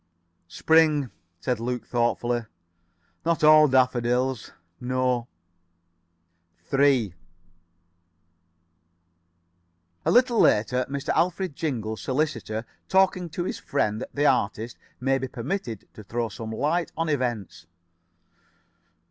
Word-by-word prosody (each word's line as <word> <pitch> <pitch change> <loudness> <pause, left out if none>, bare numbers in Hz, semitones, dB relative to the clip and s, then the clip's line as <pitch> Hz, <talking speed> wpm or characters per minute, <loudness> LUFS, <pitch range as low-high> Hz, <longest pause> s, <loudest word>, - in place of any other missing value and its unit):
"Spring," 155 - +3 0.3
said 125 +1 -1
Luke, 125 +1 -3
thoughtfully. 120 -1 0 0.8
"Not 165 -1 0
all 155 0 +8
daffodils. 125 -1 +1 0.3
No." 125 -1 0 1.4
3 135 -4 +2 2.9
A - - 0
little 245 -1 +4
later 125 +4 +3
Mr. 140 0 -4
Alfred 180 -2 0
Jingle, 115 -9 -3
solicitor, 130 -5 -2 0.2
talking 190 -2 +2
to 175 +3 -3
his - - -4
friend 110 -5 -1
the 145 +1 0
artist, 115 -3 +1 0.2
may 135 +1 +1
be 130 - -3
permitted 120 - -5
to 110 - -11
throw 115 +3 -3
some 110 +2 -7
light 155 +9 -1
on 165 0 0
events. 120 - -3
130 Hz, 95 wpm, -25 LUFS, 120-155 Hz, 2.9 s, all